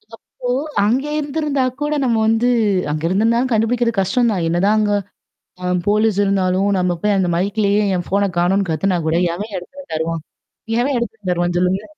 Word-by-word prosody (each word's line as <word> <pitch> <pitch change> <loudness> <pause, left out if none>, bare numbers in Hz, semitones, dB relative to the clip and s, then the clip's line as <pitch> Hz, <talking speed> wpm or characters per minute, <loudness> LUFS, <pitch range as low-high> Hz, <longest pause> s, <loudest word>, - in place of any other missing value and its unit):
அப்போ 245 +2 -8 0.3
அங்க 245 +7 +1
இருந்திருந்தா 290 -2 -1 0.2
கூட 295 +1 0
நம்ம 235 -3 +1
வந்து 225 +2 +2 0.4
அங்க 155 +1 -2
இருந்திருந்தாாலும் 230 +7 +1
கண்டுபிடிக்கிறது 230 0 +1
கஷ்டம் 235 +5 +1
தான். 180 -4 -1
என்னதான் 190 +6 +2
அங்க 205 -1 +1 0.7
ஆ - - -6 0.2
போலீஸ் 210 -1 +2
இருந்தாலும், 195 0 +1
நம்ம 180 -1 +1
போய் 210 -1 +2
அந்த 185 -2 +1
மைக்லேயே 205 +2 +1
என் 175 - -4
ஃபோன 200 +1 +1
காணோம்ன்னு 190 +2 +2
கத்துனா 180 +4 0
கூட 160 - +1 0.2
எவன் 205 +3 -6
எடத்தத 275 +11 -9
தருவான்? 160 0 -2 0.6
எவன் 270 +1 0
எடத்தத 225 -2 -5
தருவான் 175 0 0
சொல்லுங்க. 185 +2 +1
205 Hz, 160 wpm, -19 LUFS, 180-235 Hz, 0.7 s, வந்து